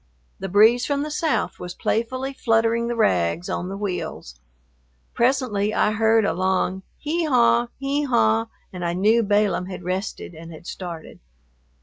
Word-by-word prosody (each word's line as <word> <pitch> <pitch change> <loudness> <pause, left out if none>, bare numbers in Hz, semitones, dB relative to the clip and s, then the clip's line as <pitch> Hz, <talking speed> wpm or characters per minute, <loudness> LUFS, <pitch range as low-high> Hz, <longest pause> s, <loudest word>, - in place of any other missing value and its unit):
The 195 - -4
breeze 220 +6 +5
from 285 0 0
the 305 - -5
south 315 +1 -1
was 180 -1 -7
playfully 255 +4 -2
fluttering 230 -2 +1
the 240 - -2
rags 160 - +1
on 180 - -3
the 195 - -5
wheels. 180 - -5 0.7
Presently 235 -5 +1
I 210 - +3
heard 220 0 +3
a - - +1
long 185 0 0 0.2
"hee 325 +3 -1
haw, 240 -3 +3
hee 280 +2 -1
haw," 110 - +2 0.3
and 180 -1 -6
I 170 0 -1
knew 215 +6 +3
Balaam 205 -3 +1
had 185 -1 -7
rested 185 0 -4
and 165 +1 -11
had 160 +1 -12
started. 175 -4 -7
210 Hz, 155 wpm, -23 LUFS, 180-240 Hz, 0.7 s, breeze